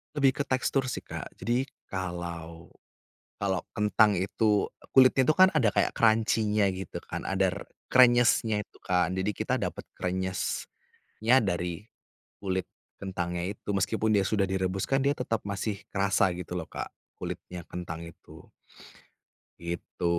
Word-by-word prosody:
Lebih 140 -1 +3
ke - - +2
tekstur 130 0 +1
sih - - -5
Kak, - - -6
jadi 125 +4 0 0.2
kalau 85 -3 -6 0.6
kalau 95 -2 0 0.2
kentang 105 0 +4
itu 105 +3 +2 0.3
kulitnya 130 0 +7
itu 155 - +4
kan 185 0 +7
ada 130 -9 +4
kayak 100 0 +1
crunchy-nya 110 -2 +3
gitu 95 -1 -6
kan, - - -5
ada 95 -1 +2
r - - -6 0.3
kresnyesnya 120 -4 +5
itu - - -23
kan, 90 -1 +1
jadi 95 +2 -1
kita 105 - -2
dapet - - -4
krenyesnya 95 0 -3 0.5
dari 90 0 -3 0.5
kulit 95 -2 -1 0.3
kentangnya 90 -2 -3
itu, 105 - -13
meskipun 110 +3 +1
dia 100 - +4
sudah 105 -2 +2
direbus 95 0 -1
kan 135 0 +1
dia 140 +1 +3
tetap 115 -4 -1
masih 100 +1 -3
kerasa, 100 -1 +2
gitu 90 0 -6
loh 85 -3 -4
Kak, - - -6 0.2
kulitnya 90 -2 -6
kentang 85 -2 -6
itu. 85 - -14 1.1
Gitu. 85 +1 -5
100 Hz, 140 wpm, -28 LUFS, 90-110 Hz, 1.1 s, kulitnya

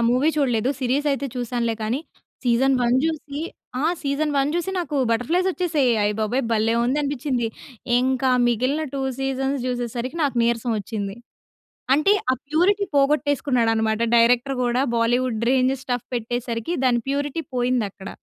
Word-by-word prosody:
Movie 260 +5 +3
చూడలేదు 250 -3 +1
series 265 +4 0
అయితే 275 +1 -2
చూసానులే. 240 -1 -1
కానీ 235 +6 -1 0.4
సీజన్ 255 +3 +3
1 240 +1 +3
చూసి 300 -2 -3 0.4
ఆ! - - -1 0.2
సీజన్ 290 +2 0
1 275 +1 +2
చూసి 345 +2 -1
నాకు 320 -4 -2
బటర్ 230 +1 0
ఫ్లైస్ 365 +2 +2
వచ్చేసాయి. 320 -8 +1
అయ్యబాబోయ్! 215 +5 0
భలే 225 +1 +2
ఉంది 265 +5 +1
అనిపించింది. 270 -4 -1 0.5
ఇంక 260 +1 0 0.2
మిగిలిన 255 +6 +1
2 270 - -2 0.2
సీజన్స్ 270 +1 -1
చూసేసరికి 245 +3 -3
నాకు 275 -4 0
నీరసం 235 0 0
వచ్చింది. 200 0 -5 0.8
అంటే 305 +8 +4 0.2
ఆ - - +3
ప్యూరిటీ 380 +6 +2
పోగొట్టేసుకున్నాడు 280 -4 +2
అన్నమాట. 220 0 0 0.2
డైరెక్టర్ 245 +3 +3
కూడా 245 +1 +1 0.2
బాలీవుడ్ 235 0 +1
రేంజ్ 260 0 +3
స్టఫ్ 245 -2 -3
పెట్టేసరికి 240 +3 -3
దాన్ని 240 -2 +3
ప్యూరిటీ 285 +3 -1
పోయింది 245 -2 +1
అక్కడ. 190 0 -10
255 Hz, 145 wpm, -23 LUFS, 235-285 Hz, 0.8 s, అంటే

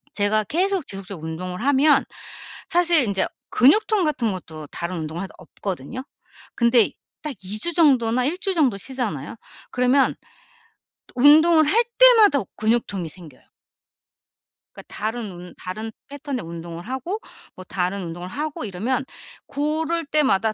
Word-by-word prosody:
제가 210 +1 +2
계속 365 - 0
지속적으로 195 -4 -7
운동을 180 +5 -5
하면 285 +2 +4 0.6
사실 340 -5 +4
인제 200 -3 0 0.2
근육통 400 - +4
같은 255 -8 0
것도 160 -4 -9
다른 175 +1 -4
운동해도 165 +5 -6
없거든요. 195 - -6 0.5
근데 235 -2 +4 0.3
딱 300 -2 -3
2 195 +3 -4
주 345 - +1
정도나 255 -7 +3
1 320 +6 0
주 390 0 -1
정도 285 - +2
쉬잖아요. 215 - -4 0.4
그러면 255 +2 +2 0.9
또 - - -20
운동을 315 +3 +7
할 450 +11 +3
때마다 450 - +7
오 200 - -7
근육통이 215 -5 -1
생겨요. 155 -4 -15 1.2
그러니까 - - -11
다른 220 0 -4
운 175 0 -11
다른 215 +5 -6 0.2
패턴의 280 - -5
운동을 170 0 -8
하고 265 - -4 0.4
뭐 185 - -10
다른 185 +1 -2
운동을 175 +1 -7
하고 295 +2 -4
이러면 230 +7 -2 0.4
고럴 315 +3 -1
때마다 265 -8 +2
240 Hz, 295 characters per minute, -22 LUFS, 185-300 Hz, 1.2 s, 운동을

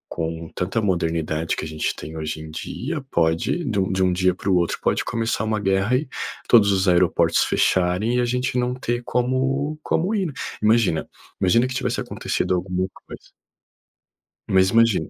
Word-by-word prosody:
com 80 0 -3
tanta 95 +5 -1
modernidade 80 -4 -1
que - - -4
a - - -5
gente 80 0 -2
tem 80 +2 -8
hoje 80 0 -4
em 80 0 -9
dia, 150 - -4
pode 85 - +1
de 110 -6 0
um 95 0 0
de 95 0 +1
um 90 -1 +2
dia 90 0 +2
para - - -8
o 95 - +4
outro, 85 -1 +1
pode - - +1
começar 115 -1 -1
uma 110 -1 0
guerra 95 +4 +2
e 145 +3 -3 0.4
todos 105 -4 +6
os 95 0 +1
aeroportos 90 0 +3
fecharem 95 +7 +1
e - - +3
a - - +1
gente 125 +1 -1
não 125 0 0
ter 120 -1 -2
como 130 +5 0
como 185 +6 0
ir, 195 -3 0
né. 150 - -7 0.3
Imagina 110 -6 +2 0.3
imagina 115 +7 +4
que 130 - -5
tivesse - - -1
acontecido - - -2
alguma 90 +1 -1 0.2
coisa - - -12 1.2
Mas 95 0 +4
imagina 115 -8 +3
95 Hz, 185 wpm, -22 LUFS, 90-125 Hz, 1.2 s, todos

